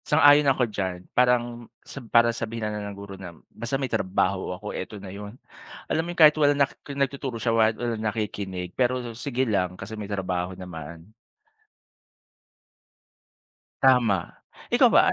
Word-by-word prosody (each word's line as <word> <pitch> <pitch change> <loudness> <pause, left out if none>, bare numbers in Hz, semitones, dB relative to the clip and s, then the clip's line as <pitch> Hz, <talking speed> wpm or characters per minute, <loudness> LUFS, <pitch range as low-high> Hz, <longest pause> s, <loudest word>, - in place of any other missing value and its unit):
sang-ayon 145 0 +5
ako 130 -2 +3
diyan 95 -3 -4
parang 120 -1 +1 0.2
sa 140 - -9
para 115 -1 +3
sabihin 115 -2 -4
na 105 - -4
ng 100 - -8
guro 100 -1 -9
na 85 -3 -9 0.2
basta 120 +3 -3
may 135 -2 -3
trabaho 95 0 0
ako 105 +2 -7
eto 95 +3 -6
na 95 -1 -9
yun, 105 +3 -8 0.5
alam 160 +1 0
mo 175 - -5
yung 175 - -8
kahit 155 -1 +8
wala 145 -2 +4
na 140 -1 +3 0.2
nagtuturo 140 -3 -3
siya 115 0 +1
wala 110 0 +4
walang 115 -2 -2
nakikinig 100 -4 -3
pero 125 -2 0
sige 130 +1 -2
lang 90 -3 -1
kasi 110 +3 -7
may 105 -1 -7
trabaho 90 -2 -2
naman. 85 -2 -9 2.8
Tama 120 -9 +3 0.4
ikaw - - +6
ba - - +5
110 Hz, 155 wpm, -25 LUFS, 95-125 Hz, 2.8 s, kahit